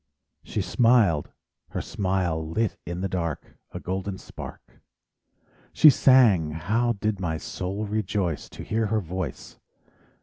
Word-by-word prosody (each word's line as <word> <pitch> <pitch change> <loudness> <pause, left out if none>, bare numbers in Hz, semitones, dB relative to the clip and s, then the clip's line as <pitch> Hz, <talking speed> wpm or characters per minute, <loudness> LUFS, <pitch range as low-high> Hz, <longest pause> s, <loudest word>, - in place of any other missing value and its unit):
She - - -3
smiled—her 115 -11 +1
smile 90 -5 -1
lit 110 +5 0
in 85 +1 -4
the 95 - 0
dark 85 -4 -4
A - - -6
golden 95 +1 -4
spark; - - -11 0.9
She 155 - +8
sang—how 110 - +3
did 105 -1 -2
my 80 -4 -2
soul 95 +6 -4
rejoice 100 -6 -2
To - - -9
hear 110 +2 0
her 110 +1 +1
voice! 90 -6 -6
95 Hz, 115 wpm, -25 LUFS, 85-110 Hz, 0.9 s, She